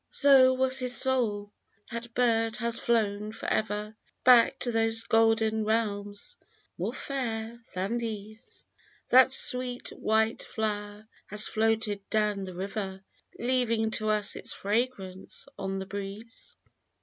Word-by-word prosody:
So 265 -2 +5
was 260 0 +3
his 250 -1 +1
soul! 220 -6 +1 0.4
That 235 0 -7
bird 225 -2 +1
has 235 +1 +2
flown 210 -2 0
for - - -9
ever 210 0 -2 0.3
Back 250 +1 +6
to 245 - 0
those 225 0 +1
golden 225 -1 +2
realms, 205 -2 -2 0.4
more - - -3
fair 235 -4 -4
than 195 +6 -2
these; 215 -1 -8 0.4
That 260 +1 +6
sweet 250 -1 +3
white 220 +1 0
flow'r 210 -1 -4 0.2
has 210 +1 +6
floated 220 -2 -1
down 210 -2 0
the 185 -1 -9
river, 195 0 -5 0.3
Leaving 235 -3 0
to 215 0 -1
us 210 -1 +1
its - - -2
fragrance 205 -3 -3
on 195 0 -3
the 190 - -5
breeze. 200 +4 -8
220 Hz, 125 wpm, -28 LUFS, 205-235 Hz, 0.4 s, Back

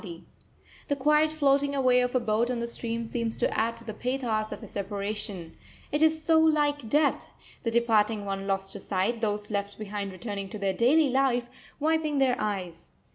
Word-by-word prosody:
] - - -27
The 285 - +1
quiet 300 +3 +3
floating 280 -2 +2
away 255 -2 +4
of 250 +1 -1
a - - +5
boat 230 0 +1
on 250 - -1
the 235 - -1
stream 235 0 -3
seems 230 0 -2
to - - 0
add 230 +1 0
to 230 - -6
the 220 - -5
pathos 235 -3 -2
of - - -7
a - - -6
separation 200 -3 -4 0.4
it 295 - 0
is 315 0 +3
so 320 0 +4
like 295 -5 +2
death 295 +2 +1 0.3
the 230 - -1
departing 225 -2 +2
one 195 0 -4
lost 195 0 -1
to - - -7
sight, 205 +5 -1
those 210 -1 -2
left 200 0 -3
behind 205 -2 -4
returning 200 0 -5
to 215 - -6
their 195 -1 0
daily 270 +8 +4
life, 250 -2 +1 0.3
wiping 310 -1 +1
their 265 -2 +3
eyes. 185 -5 -4
235 Hz, 190 wpm, -27 LUFS, 205-275 Hz, 0.4 s, a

